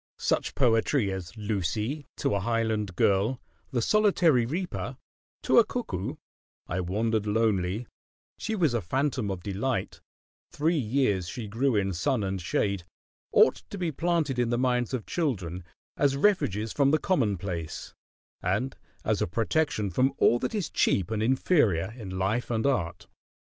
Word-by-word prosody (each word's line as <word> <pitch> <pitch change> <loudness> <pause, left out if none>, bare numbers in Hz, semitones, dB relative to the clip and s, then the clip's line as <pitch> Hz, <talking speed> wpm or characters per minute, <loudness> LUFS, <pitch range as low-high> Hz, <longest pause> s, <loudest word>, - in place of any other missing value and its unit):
Such - - 0
poetry 115 -2 +2
as 95 +2 -6
"Lucy," 110 - -2
"To - - 0
a 100 - +1
Highland 110 -3 -1
Girl," 100 +8 +2 0.3
"The 120 -5 0
Solitary 175 - +4
Reaper," 175 +7 -3 0.5
"To - - +5
a - - +7
Cuckoo," 150 - -4 0.5
"I 85 - -3
Wandered 105 +4 0
Lonely," 105 -1 +1 0.5
"She 220 - -2
Was 165 - +2
a 120 - 0
Phantom 130 - -1
of 95 -3 -4
Delight," 105 +6 -2 0.5
"Three 160 +4 +1
Years 110 - +1
She 110 +5 -5
Grew 120 +4 +1
in 95 -2 +1
Sun 100 +7 0
and 95 -1 -2
Shade," 100 +1 0 0.5
ought - - +5
to 200 - -6
be 175 -3 -1
planted 160 -5 0
in 120 -1 +2
the 120 - +1
minds 125 -1 +1
of 120 - -5
children 95 - -2 0.3
as 140 -1 +2
refuges 115 - +1
from 140 -1 +3
the 155 - +4
commonplace, 100 - -2 0.5
and 105 +9 -1 0.3
as - - +1
a - - +1
protection 110 - 0
from 130 +9 +2
all 120 - +4
that 225 - -2
is 195 -7 -2
cheap 100 +2 +1
and 110 -1 -1
inferior 110 - +2
in 95 -6 -6
life 105 +6 0
and 115 -2 0
art. 110 -12 0
115 Hz, 155 wpm, -28 LUFS, 100-140 Hz, 0.5 s, a